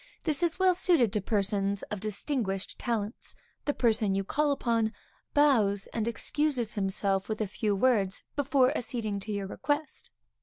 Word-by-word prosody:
This 305 Hz, -2 st, +2 dB
is 345 Hz, 0 st, +1 dB
well 375 Hz, -1 st, +4 dB
suited 340 Hz, -, +3 dB
to 210 Hz, -, 0 dB
persons 200 Hz, -1 st, 0 dB
of 210 Hz, -, -3 dB
distinguished 210 Hz, -1 st, -2 dB
talents. 225 Hz, -3 st, -3 dB, 0.3 s
The 290 Hz, -, +1 dB
person 215 Hz, -5 st, +2 dB
called 290 Hz, +8 st, +1 dB
upon, 230 Hz, -4 st, 0 dB, 0.4 s
bows 220 Hz, -9 st, +4 dB
and 225 Hz, -1 st, -1 dB
excuses 255 Hz, -1 st, -1 dB
himself 195 Hz, 0 st, 0 dB
with 215 Hz, -, -2 dB
a 215 Hz, -, +1 dB
few 205 Hz, +1 st, -1 dB
words 200 Hz, -4 st, +2 dB
before 280 Hz, -1 st, +3 dB
acceding 220 Hz, -6 st, -2 dB
to 215 Hz, +2 st, -5 dB
your 200 Hz, -1 st, -2 dB
request. 290 Hz, +9 st, -3 dB
220 Hz, 150 wpm, -29 LUFS, 200-280 Hz, 0.4 s, well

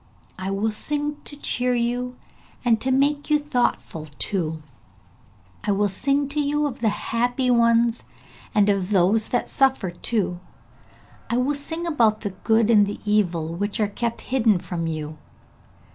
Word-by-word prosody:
I 190 Hz, +1 st, -3 dB
will 200 Hz, +3 st, 0 dB
sing 295 Hz, +6 st, -2 dB
to 290 Hz, -, -8 dB
cheer 250 Hz, -3 st, -1 dB
you 245 Hz, +1 st, -1 dB, 0.5 s
and 225 Hz, -2 st, +3 dB
to 265 Hz, -, -1 dB
make 285 Hz, +3 st, +1 dB
you 300 Hz, -, +5 dB
thoughtful 245 Hz, -, -1 dB
too; 160 Hz, -5 st, -2 dB, 1.0 s
I 210 Hz, -, 0 dB
will 205 Hz, +1 st, +1 dB
sing 275 Hz, +8 st, +1 dB
to 295 Hz, +1 st, -2 dB
you 295 Hz, +1 st, +1 dB
of 275 Hz, -2 st, -4 dB
the 225 Hz, -2 st, +2 dB
happy 245 Hz, +4 st, 0 dB
ones, 235 Hz, 0 st, +3 dB, 0.5 s
and 205 Hz, -1 st, +4 dB
of 195 Hz, -2 st, +1 dB
those 205 Hz, +3 st, +3 dB
that 245 Hz, -, 0 dB
suffer 265 Hz, -9 st, +1 dB
too. 180 Hz, 0 st, -1 dB, 0.9 s
I 235 Hz, -, +1 dB
will 255 Hz, +4 st, +1 dB
sing 320 Hz, +4 st, -4 dB
about 230 Hz, -10 st, +2 dB
the 205 Hz, -, -3 dB
good 220 Hz, +4 st, +2 dB
and 205 Hz, -3 st, +5 dB
the 205 Hz, -, -5 dB
evil, 175 Hz, -6 st, +1 dB
which 200 Hz, +5 st, -3 dB
are 210 Hz, -, +2 dB
kept 235 Hz, +3 st, -3 dB
hidden 230 Hz, -6 st, +2 dB
from 170 Hz, -1 st, -4 dB
you. 155 Hz, -1 st, -5 dB
230 Hz, 160 wpm, -23 LUFS, 200-265 Hz, 1.0 s, you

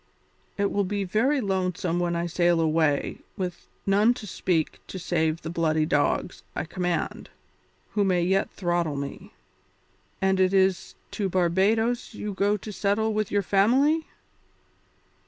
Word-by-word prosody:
It 200 Hz, -1 st, +1 dB
will 200 Hz, -, +1 dB
be 200 Hz, +1 st, -2 dB
very 235 Hz, +10 st, +1 dB
lonely 185 Hz, -4 st, -1 dB, 0.2 s
when 175 Hz, -1 st, 0 dB
I 170 Hz, 0 st, -1 dB
sail 175 Hz, 0 st, +2 dB
away 155 Hz, -2 st, +1 dB, 0.2 s
with 180 Hz, -3 st, -5 dB, 0.2 s
none 210 Hz, +5 st, +4 dB
to 220 Hz, -, -8 dB
speak 175 Hz, -4 st, -1 dB
to -, -, -7 dB
save 165 Hz, -2 st, -1 dB
the 165 Hz, -, -4 dB
bloody 160 Hz, -2 st, +1 dB
dogs 145 Hz, -2 st, 0 dB
I -, -, -1 dB
command, 175 Hz, -1 st, -3 dB, 0.6 s
who 210 Hz, -, +1 dB
may 180 Hz, -3 st, +2 dB
yet 190 Hz, +2 st, +1 dB
throttle 175 Hz, -4 st, -1 dB
me. 140 Hz, 0 st, -6 dB, 0.9 s
And 190 Hz, 0 st, +2 dB
it 185 Hz, +1 st, +3 dB
is 190 Hz, -1 st, +2 dB, 0.2 s
to 200 Hz, -2 st, -2 dB
Barbadoes 205 Hz, +7 st, +1 dB
you 210 Hz, -1 st, -4 dB
go 205 Hz, +2 st, +1 dB
to 210 Hz, +1 st, -8 dB
settle 215 Hz, +3 st, 0 dB
with 215 Hz, -1 st, -1 dB
your 205 Hz, -1 st, +1 dB
family?" 265 Hz, -, +3 dB
190 Hz, 145 wpm, -26 LUFS, 170-205 Hz, 0.9 s, none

